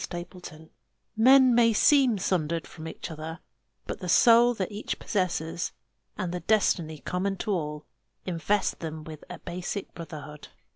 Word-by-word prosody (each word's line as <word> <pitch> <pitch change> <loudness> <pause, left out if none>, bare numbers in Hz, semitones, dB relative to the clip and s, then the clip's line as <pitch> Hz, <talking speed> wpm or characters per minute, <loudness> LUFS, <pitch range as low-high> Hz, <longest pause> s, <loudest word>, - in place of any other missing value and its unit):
_ - - -4 0.2
A 175 - -6 0.3
CREED 160 0 -17 0.4
Men 260 +3 +6
may 230 -1 +5
seem 260 -1 +4
sundered 170 -3 -1
from 160 0 -9
each 165 - -7
other; 160 +1 -6 0.5
but - - -5
the 180 - -5
soul 235 +5 +6
that 195 -1 -3
each 210 +1 -4
possesses, 175 -4 -2 0.4
and 185 -4 -3
the 180 - -2
destiny 170 -5 +1
common 190 +5 -2
to 215 - -3
all, 150 -5 -3 0.4
invest 190 +3 0
them 160 -1 -6
with 155 -1 -10
a 180 - -7
basic 180 +4 -5
brotherhood. 150 -3 -9
180 Hz, 155 wpm, -27 LUFS, 160-215 Hz, 0.5 s, Men